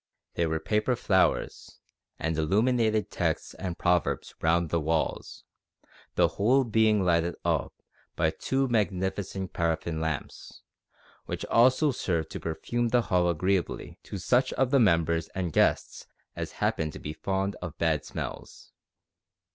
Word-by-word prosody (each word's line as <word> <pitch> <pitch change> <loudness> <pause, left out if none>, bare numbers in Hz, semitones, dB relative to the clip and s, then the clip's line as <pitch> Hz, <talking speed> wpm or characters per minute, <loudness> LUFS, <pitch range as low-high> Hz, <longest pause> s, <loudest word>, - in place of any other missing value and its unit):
There 85 -1 0
were 80 0 -1
paper 105 +7 0
flowers, 95 -5 0 0.4
and 80 0 -2
illuminated 110 +6 +1
texts - - -1
and 90 -3 -5
proverbs 90 -1 0
round 85 0 +2
the 85 - +2
walls, 80 +1 -2 0.7
the - - +4
whole 130 +7 +2
being 110 -4 +2
lighted 85 0 +2
up - - 0 0.4
by - - +2
two 135 0 -1
magnificent 95 -3 -1
paraffin 80 -1 -1
lamps, 80 -3 -5 0.6
which - - -4
also 130 +5 +4
served 85 - -2
to - - -5
perfume 120 +9 -2
the 120 +1 +3
hall 90 -1 +4
agreeably 90 +2 -1
to - - -6
such 125 +8 +2
of 130 -1 +1
the 140 - +5
members 85 -6 +2
and 90 -4 -2
guests - - +1 0.3
as - - -5
happened 80 -1 -1
to - - -8
be 75 - -6
fond 95 +4 -2
of 85 -4 -6
bad 80 -3 +1
smells. - - -7
95 Hz, 140 wpm, -28 LUFS, 80-110 Hz, 0.7 s, the